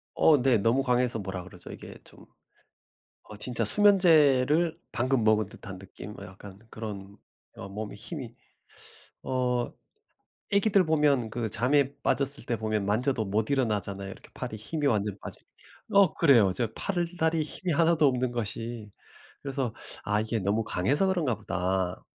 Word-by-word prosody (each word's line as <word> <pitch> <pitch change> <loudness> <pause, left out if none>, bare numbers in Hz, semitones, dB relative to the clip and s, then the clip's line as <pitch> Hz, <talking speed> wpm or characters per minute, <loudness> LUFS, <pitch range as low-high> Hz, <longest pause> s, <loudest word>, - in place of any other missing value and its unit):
어 155 -2 +5
네 130 -2 +4
너무 115 +6 +2
강해서 125 -2 +1
뭐라 95 -2 -5
그러죠? 90 -1 -11
이게 - - -10
좀 - - -15 1.1
어 - - -9
진짜 120 +2 -2
수면제를 160 - +5
방금 130 0 0
먹은 110 -1 +3
듯한 95 -1 -10
느낌? 95 +2 -11
어 - - -8
약간 95 +1 -12
그런 100 -3 -8 0.4
어 100 - -9
몸에 105 +2 -6
힘이 120 - -8 0.9
어 125 -2 -1 0.8
아기들 200 -1 +4
보면 145 -7 +2
그 115 0 -3
잠에 140 +5 +1
빠졌을 140 -1 +1
때 120 -1 -1
보면 110 -2 -1
만져도 115 +4 0
못 105 +2 -1
일어나잖아요. 100 -7 -1
이렇게 - - -12
팔에 110 - -5
힘이 145 +8 -3
완전 105 -5 0
빠져 - - -10 0.5
어 200 -4 +6
그래요. 120 - +4
저 115 +3 -1
팔다리 170 -3 -1
힘이 175 +4 -3
하나도 160 0 +3
없는 125 -1 0
것이. 115 -1 -5 0.5
그래서 135 -4 -3 0.3
'아 105 +1 +1
이게 110 +1 -2
너무 100 +4 0
강해서 115 - +1
그런가 170 -10 0
보다' 95 -2 -2
120 Hz, 295 characters per minute, -27 LUFS, 105-145 Hz, 1.1 s, 어